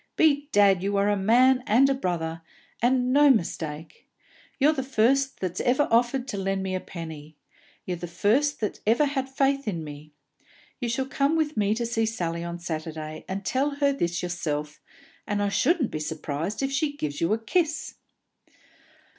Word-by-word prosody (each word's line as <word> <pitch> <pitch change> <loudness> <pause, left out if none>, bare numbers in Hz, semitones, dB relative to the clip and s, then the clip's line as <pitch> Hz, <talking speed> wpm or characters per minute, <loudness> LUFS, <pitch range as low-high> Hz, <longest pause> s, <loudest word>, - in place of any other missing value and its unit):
"Bedad, 280 - +3
you 200 +1 0
are 200 +1 +2
a 205 - +2
man 250 +6 +4
and 245 +6 +5
a 275 - +2
brother, 165 -9 -3 0.4
and 250 +1 +2
no 290 +1 +6
mistake! 165 - -2 0.5
Ye're 295 +3 +4
the 280 - -2
first 265 +2 +1
that 185 -1 -2
ever 260 +4 +2
offered 240 +3 +2
to 205 - -3
lend 195 0 -1
me 190 -1 -3
a 185 - -1
penny; 160 -4 -9 0.5
ye're 180 - -2
the 175 +1 -6
first 230 - +1
that 210 - -2
ever 235 +7 +4
had 270 -2 -2
faith 275 0 0
in 170 -6 -2
me! 150 0 -10 0.7
You 240 -3 -2
shall 260 +3 -1
come 280 +3 +1
with 310 -1 0
me 210 0 +1
to 235 +1 -2
see 225 -1 0
Sally 170 -6 -3
on 170 0 -5
Saturday, 155 -2 -6
and 190 +1 -4
tell 280 +7 0
her 280 -1 +2
this 175 -9 -2
yourself, 150 -4 -3 0.5
and 205 -1 -1
I 205 0 +1
shouldn't 295 - +1
be 155 - -3
surprised 155 - -4
if 270 - -1
she 290 0 -1
gives 145 - -4
you 165 - +1
a - - +1
kiss!" 315 +7 -1
210 Hz, 180 wpm, -26 LUFS, 170-270 Hz, 0.7 s, no